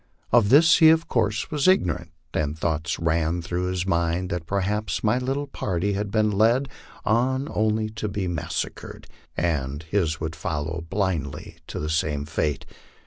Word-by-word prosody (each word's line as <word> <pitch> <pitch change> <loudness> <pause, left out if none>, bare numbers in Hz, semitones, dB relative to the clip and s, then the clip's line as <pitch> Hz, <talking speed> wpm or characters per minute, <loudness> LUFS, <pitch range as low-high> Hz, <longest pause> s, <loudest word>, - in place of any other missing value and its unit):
Of 115 -4 +5
this 155 +5 +7
he 160 - +8
of 160 +1 +3
course 110 -2 0
was 150 +2 +1
ignorant, 90 - +2 0.2
and 75 0 -1
thoughts 80 -2 -1
ran 85 +1 0
through 90 +2 -2
his 90 -1 -1
mind 85 0 0
that 85 -2 -3
perhaps 100 +3 -1
my 110 +3 +2
little 135 +3 -2
party 100 -7 -2
had 100 +1 -2
been 110 0 +2
led 115 +7 +3 0.4
on 130 +5 +1
only 110 0 +1
to 110 0 -4
be 100 -2 -2
massacred, 85 -4 -4 0.3
and 75 -3 -1
his 80 -2 0
would 80 0 -4
follow 80 +1 -3
blindly 85 -5 -2
to - - -5
the 75 - -3
same 75 -2 0
fate. 75 -2 -2
90 Hz, 160 wpm, -24 LUFS, 80-110 Hz, 0.4 s, he